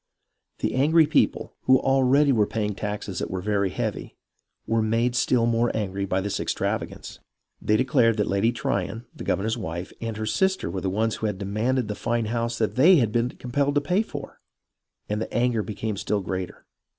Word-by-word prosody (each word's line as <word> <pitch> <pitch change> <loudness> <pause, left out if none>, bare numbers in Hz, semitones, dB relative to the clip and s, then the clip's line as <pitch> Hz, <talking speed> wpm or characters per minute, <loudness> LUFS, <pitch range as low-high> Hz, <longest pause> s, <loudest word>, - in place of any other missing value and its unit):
The - - 0
angry 155 +5 +4
people, 150 - +1
who 130 0 +6
already 135 +2 +3
were 110 -5 +3
paying 105 -2 -2
taxes 105 -1 -4
that - - -3
were 95 - -3
very 100 0 0
heavy, - - -4 0.5
were 115 0 +1
made 115 +3 +1
still 125 -1 +2
more 115 0 +2
angry 100 -2 -2
by 95 0 0
this 100 +1 -2
extravagance. - - -3 0.4
They 105 - +2
declared 120 -3 +3
that 105 - +2
Lady 100 +4 +1
Tryon, 115 0 -2
the - - -8
governor's 110 +4 -1
wife, 85 -1 -5
and 115 -2 -4
her 110 - -3
sister 190 - 0
were 95 - -3
the 95 - -1
ones 110 +3 0
who 110 - -1
had 105 -2 -3
demanded 110 +5 -1
the 105 - -2
fine 115 +2 -1
house 115 +1 -2
that 110 +1 -1
they 170 +8 +7
had 120 -9 +2
been 120 +2 +1
compelled 140 +3 -1
to 145 - +3
pay 180 +8 +1
for; 225 - -8 0.7
and 105 +1 -2
the - - -4
anger 120 -2 +1
became 105 0 -4
still 105 0 -1
greater. 95 -1 -5
115 Hz, 190 wpm, -25 LUFS, 105-125 Hz, 0.7 s, they